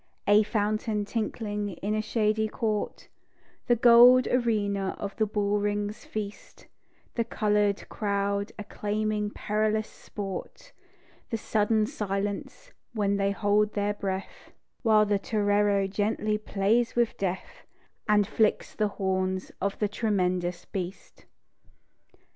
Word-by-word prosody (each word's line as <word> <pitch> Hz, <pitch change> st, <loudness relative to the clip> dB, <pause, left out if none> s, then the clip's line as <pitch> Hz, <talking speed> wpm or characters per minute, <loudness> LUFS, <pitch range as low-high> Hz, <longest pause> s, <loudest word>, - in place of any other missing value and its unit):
A 205 Hz, +1 st, +6 dB
fountain 210 Hz, 0 st, -1 dB
tinkling 210 Hz, -2 st, -3 dB
in 205 Hz, +4 st, -3 dB
a 215 Hz, -, +1 dB
shady 215 Hz, 0 st, +1 dB
court; 215 Hz, -2 st, -3 dB, 0.6 s
The 240 Hz, -, +5 dB
gold 245 Hz, +2 st, +7 dB
arena 205 Hz, -5 st, 0 dB
of 200 Hz, -1 st, -5 dB
the 220 Hz, -, +2 dB
bull 205 Hz, 0 st, 0 dB
ring's 205 Hz, +2 st, -2 dB
feast; 210 Hz, -1 st, -7 dB, 0.5 s
The 235 Hz, -, 0 dB
coloured 210 Hz, -2 st, 0 dB
crowd 200 Hz, 0 st, -1 dB
acclaiming 210 Hz, 0 st, -2 dB
perilous 215 Hz, +1 st, -1 dB
sport; 205 Hz, -, -7 dB, 0.6 s
The 225 Hz, -, -1 dB
sudden 215 Hz, 0 st, +1 dB
silence 205 Hz, -, -4 dB, 0.2 s
when 200 Hz, -3 st, +1 dB
they 200 Hz, 0 st, +1 dB
hold 205 Hz, +1 st, +1 dB
their 205 Hz, 0 st, 0 dB
breath, 195 Hz, -1 st, -5 dB, 0.3 s
While 215 Hz, -3 st, +5 dB
the 205 Hz, -1 st, +1 dB
torero 205 Hz, -1 st, +2 dB
gently 210 Hz, +2 st, -1 dB
plays 215 Hz, +3 st, +1 dB
with 240 Hz, -1 st, +2 dB
death, 185 Hz, -1 st, -4 dB, 0.4 s
And 210 Hz, -1 st, +5 dB
flicks 220 Hz, +1 st, +1 dB
the 215 Hz, -, +1 dB
horns 185 Hz, -1 st, -1 dB
of 200 Hz, 0 st, -1 dB
the 210 Hz, -, +1 dB
tremendous 180 Hz, -5 st, -1 dB
beast. 185 Hz, 0 st, -7 dB
210 Hz, 120 wpm, -27 LUFS, 200-215 Hz, 0.6 s, gold